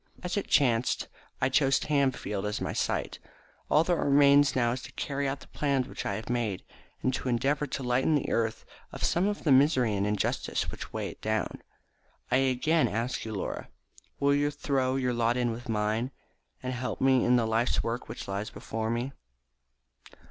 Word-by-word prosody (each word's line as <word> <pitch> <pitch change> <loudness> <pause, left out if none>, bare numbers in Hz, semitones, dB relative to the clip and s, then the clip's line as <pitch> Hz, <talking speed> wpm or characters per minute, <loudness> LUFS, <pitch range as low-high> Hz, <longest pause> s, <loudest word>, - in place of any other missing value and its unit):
As 180 - -2
it 205 - -2
chanced, 125 -4 +2 0.3
I 130 - +3
chose 135 -1 +3
Tamfield 130 -9 0
as 105 - -2
my - - -3
site. - - -2 0.5
All 155 - +5
that 175 +1 +1
remains 145 -1 +5
now 120 -2 +2
is 125 +1 -3
to - - -10
carry 140 0 -2
out 135 0 -3
the - - -13
plans 140 -3 0
which - - -5
I 100 - -1
have 110 +2 -6
made, 115 -6 -1 0.4
and 130 - +1
to 130 - -2
endeavour 140 +5 +1
to 135 - -4
lighten 125 +5 +2
the 145 - -1
earth 115 -1 -1 0.3
of - - -7
some 180 +4 +2
of 205 0 -2
the 150 - +2
misery 130 -4 +4
and 100 +1 0
injustice 105 -1 -1
which - - -8
weigh - - -3
it - - -12
down. 110 0 -2 0.7
I 130 - +5
again 135 +5 +2
ask 115 +4 -2
you, 110 -1 -4
Laura, 95 - -4 0.5
will 140 0 +3
you 145 +1 +2
throw 135 -3 0
in 135 - -1
your 125 -1 +1
lot 120 0 +1
with 120 0 -2
mine, 110 +3 0 0.5
and 130 0 -2
help 125 0 -3
me 130 -1 +4
in 125 - +4
the 120 -2 +3
life's 110 +2 +1
work 115 +2 -3
which - - -7
lies 100 +2 -3
before 110 0 -4
me?" 120 +4 -2
130 Hz, 190 wpm, -29 LUFS, 115-140 Hz, 0.7 s, All